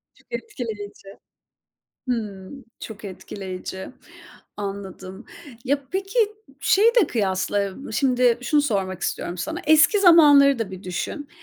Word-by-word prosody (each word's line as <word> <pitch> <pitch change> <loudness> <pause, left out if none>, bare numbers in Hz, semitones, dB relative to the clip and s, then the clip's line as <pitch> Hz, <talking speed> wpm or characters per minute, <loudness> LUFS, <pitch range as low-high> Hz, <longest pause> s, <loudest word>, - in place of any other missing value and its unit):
Çok - - -27
etkileyici. 220 - -7 1.0
Hımm. 220 +1 -5 0.2
Çok 215 -1 -9
etkileyici. 190 -1 -7 0.7
Anladım. 195 0 -7 0.4
Ya, 280 +1 0
peki, 390 +5 -3 0.4
şeyi 435 +4 +4
de 360 - +3
kıyasla, 195 -2 -1 0.2
ı - - -8
şimdi 250 -3 +2
şunu 290 +4 +2
sormak 195 -8 -2
istiyorum 175 - -3
sana. 320 - -4
Eski 315 +7 +5
zamanları 290 -7 +7
da 220 -4 -3
bir 185 0 -9
düşün. 210 +10 -5
225 Hz, 115 wpm, -23 LUFS, 195-290 Hz, 1.0 s, zamanları